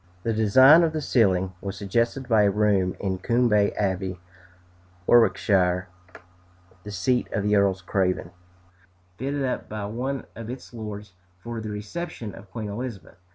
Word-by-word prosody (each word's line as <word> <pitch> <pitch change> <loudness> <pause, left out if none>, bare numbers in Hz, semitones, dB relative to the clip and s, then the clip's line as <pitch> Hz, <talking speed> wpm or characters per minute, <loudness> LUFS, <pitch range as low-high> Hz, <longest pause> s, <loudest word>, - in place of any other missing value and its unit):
The 115 - 0
design 130 +9 +7
of 165 -2 +1
the 155 - -1
ceiling 95 -9 +2
was 100 0 -5
suggested 115 +6 -1
by 110 -3 +4
a 100 - +4
room 100 -2 +1
in 95 -2 -2
Coombe 105 -1 +2
Abbey, 95 -2 -2 0.9
Warwickshire, 95 -6 +3 0.9
the 105 - -10
seat 115 +6 0
of 105 - -1
the 105 0 +2
Earls 95 -2 +2
Craven, 90 -2 -1 0.9
fitted 140 +2 -2
up 125 - -3
by 105 -1 -4
one 125 +5 -4
of 115 0 -8
its 125 0 -8
lords 105 -3 -7 0.2
for 115 +4 -6
the 110 - -5
reception 105 - -6
of 100 0 -13
Queen 105 +2 -5
Elizabeth. 105 -5 -7
105 Hz, 150 wpm, -25 LUFS, 95-120 Hz, 0.9 s, design